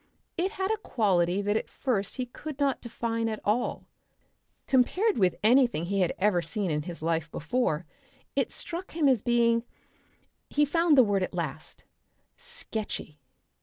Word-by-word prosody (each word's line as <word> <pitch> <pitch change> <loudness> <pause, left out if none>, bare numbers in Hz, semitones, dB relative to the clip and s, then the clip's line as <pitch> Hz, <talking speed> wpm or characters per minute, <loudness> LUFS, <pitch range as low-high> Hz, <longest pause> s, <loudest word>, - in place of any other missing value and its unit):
It 375 +4 -1
had 380 +1 -1
a 440 - +1
quality 195 - +1
that 205 +1 +1
at - - -1
first 210 -7 -1
he 255 - -1
could 285 +4 -8
not 275 -3 +1
define 230 -1 -2
at 215 - -3
all. 215 +4 0 0.8
Compared 365 - +2
with 185 -3 +3
anything 240 - +4
he 200 +2 -1
had 180 -3 +2
ever 190 -3 +2
seen 200 0 -2
in 150 0 0
his 170 0 -8
life 165 0 0
before 165 -1 -1 0.5
it - - +1
struck 350 +3 -5
him 315 -3 +2
as 255 -6 +4
being 235 -1 +3 0.9
he 295 +1 +3
found 330 +1 +3
the 260 - +9
word 200 -3 +1
at 185 - -3
last - - -5 0.5
sketchy. 220 - -5
230 Hz, 160 wpm, -28 LUFS, 190-275 Hz, 0.9 s, the